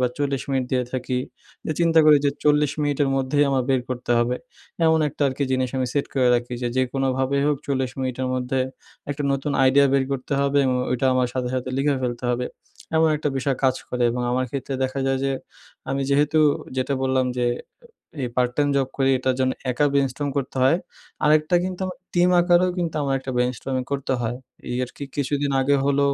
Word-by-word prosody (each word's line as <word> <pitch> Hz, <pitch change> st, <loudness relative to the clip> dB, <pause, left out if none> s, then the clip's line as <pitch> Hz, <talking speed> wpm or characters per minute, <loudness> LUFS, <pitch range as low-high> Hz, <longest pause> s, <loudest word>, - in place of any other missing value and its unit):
বা, 125 Hz, -, +3 dB
৪০ 140 Hz, -2 st, -1 dB
মিনিট 135 Hz, -1 st, +1 dB
দিয়ে 125 Hz, -1 st, +2 dB
থাকি। 125 Hz, 0 st, -2 dB, 0.5 s
যে -, -, -1 dB
চিন্তা 165 Hz, -1 st, +4 dB
করি 150 Hz, -, +8 dB
যে -, -, +3 dB
৪০ 150 Hz, -1 st, +3 dB
মিনিটের 145 Hz, -1 st, +1 dB
মধ্যেই 135 Hz, +2 st, +2 dB
আমার 135 Hz, -1 st, +2 dB
বের 130 Hz, -1 st, +3 dB
করতে 125 Hz, -1 st, -5 dB
হবে, 120 Hz, +1 st, +1 dB, 0.5 s
এমন 160 Hz, 0 st, +4 dB
একটা 145 Hz, -, -4 dB
আরকি 135 Hz, +2 st, -2 dB
জিনিস 130 Hz, 0 st, +1 dB
আমি 130 Hz, -, 0 dB
set 145 Hz, -, +1 dB
করে 130 Hz, -2 st, +3 dB
রাখি 120 Hz, 0 st, -1 dB
যে, 120 Hz, -, 0 dB
যে 130 Hz, -, +4 dB
কোনোভাবেই 135 Hz, +1 st, 0 dB
হোক 150 Hz, -1 st, +2 dB
৪০ 130 Hz, -2 st, -1 dB
মিনিটের 130 Hz, 0 st, -2 dB
মধ্যে 130 Hz, +1 st, -1 dB, 0.5 s
একটা 145 Hz, +1 st, -3 dB
নতুন 140 Hz, +1 st, -2 dB, 0.2 s
idea 140 Hz, +2 st, +5 dB
বের 135 Hz, -1 st, +3 dB
করতে 135 Hz, +1 st, -4 dB
হবে 140 Hz, 0 st, +2 dB
এবং 130 Hz, -1 st, +1 dB
ওইটা 125 Hz, +1 st, +1 dB
আমার 125 Hz, -1 st, +2 dB
সাথে, 125 Hz, -1 st, -2 dB
সাথে 130 Hz, 0 st, -2 dB
লিখে 140 Hz, +1 st, +2 dB
ফেলতে 120 Hz, 0 st, -3 dB
হবে। 125 Hz, +1 st, -1 dB, 0.5 s
এমন 160 Hz, 0 st, +4 dB
একটা 150 Hz, 0 st, -1 dB
বিষয় 135 Hz, 0 st, 0 dB
কাজ 130 Hz, -1 st, +4 dB
করে 125 Hz, 0 st, -2 dB
এবং 125 Hz, +1 st, -2 dB
আমার 130 Hz, +1 st, +1 dB
ক্ষেত্রে 135 Hz, +1 st, -4 dB
দেখা 130 Hz, +1 st, -1 dB
যায় 135 Hz, 0 st, +1 dB
যে 135 Hz, -, +1 dB, 0.6 s
আমি 135 Hz, 0 st, 0 dB
যেহেতু 150 Hz, +2 st, +3 dB, 0.4 s
যেটা 130 Hz, +2 st, 0 dB
বললাম 130 Hz, -1 st, +1 dB
যে, 120 Hz, -, +1 dB, 0.7 s
এ -, -, -6 dB
এই -, -, 0 dB
part 125 Hz, -1 st, +2 dB
time 145 Hz, -1 st, +2 dB
job 135 Hz, -2 st, +2 dB
করি। 135 Hz, -1 st, +2 dB
এটার 130 Hz, 0 st, 0 dB
জন্য 130 Hz, 0 st, +2 dB, 0.2 s
একা 135 Hz, +4 st, +1 dB
brainstorm 140 Hz, +1 st, 0 dB
করতে 135 Hz, -1 st, -3 dB
হয়। 135 Hz, +6 st, +4 dB, 0.5 s
আরেকটা 155 Hz, +3 st, +4 dB
কিন্তু 185 Hz, -1 st, -4 dB
আমার 185 Hz, -, -6 dB, 0.2 s
টিম 175 Hz, 0 st, +4 dB
আকারেও 175 Hz, +1 st, +4 dB
কিন্তু 170 Hz, -3 st, -2 dB
আমার 135 Hz, -1 st, 0 dB
একটা 130 Hz, 0 st, -6 dB
brainstorming 125 Hz, +1 st, -1 dB
করতে 140 Hz, -1 st, -1 dB
হয়। 120 Hz, +1 st, -2 dB, 0.3 s
এই 120 Hz, -, -2 dB
আরকি 135 Hz, -, -10 dB
কিছুদিন 145 Hz, 0 st, -1 dB
আগে 140 Hz, +2 st, +3 dB
হল 140 Hz, 0 st, +2 dB
135 Hz, 205 wpm, -23 LUFS, 130-145 Hz, 0.7 s, করি